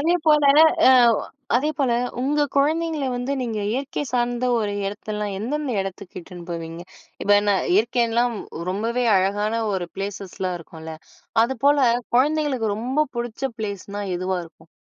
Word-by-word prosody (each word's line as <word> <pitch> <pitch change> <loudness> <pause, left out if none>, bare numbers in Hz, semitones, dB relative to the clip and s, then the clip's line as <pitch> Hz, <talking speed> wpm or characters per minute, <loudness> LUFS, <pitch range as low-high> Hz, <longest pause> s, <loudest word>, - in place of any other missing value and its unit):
அதே 330 +4 +2
போல, 300 -1 +5 0.5
அ - - +8 0.7
அதே 295 +5 +1
போல 260 -4 +2 0.3
உங்க 295 +2 +2
குழந்தைங்கள 310 +1 +1
வந்து 250 +3 -2
நீங்க 225 -3 -3
இயற்கை 275 +3 -3
சார்ந்த 245 0 0
ஒரு 205 -2 -1
எடத்தல்லாம், 210 0 -4
எந்தெந்த 280 +6 -2
எடத்துக்கு 195 0 -7
இட்டுன்னு 175 -1 -11
போவீங்க, 165 0 -5 0.4
இப்ப 205 - -1
என்ன 205 -1 +2 0.2
இயற்கைன்லாம், 235 +1 +2 0.3
ரொம்பவே 230 +5 -1
அழகான 205 +4 0
ஒரு 180 -2 -2
ப்ளேஸஸ்லாம் 195 -2 -4
இருக்குன்ல, 160 0 -9 0.5
அது 265 +1 -3
போல 285 0 +5 0.4
குழந்தைங்களுக்கு 265 -6 +1
ரொம்ப 260 +7 0
புடிச்ச 235 +1 -5 0.2
பிளேஸ்னா 205 -1 -5
எதுவா 185 +1 -1
இருக்கும்? 160 0 -19
225 Hz, 135 wpm, -23 LUFS, 195-270 Hz, 0.7 s, அ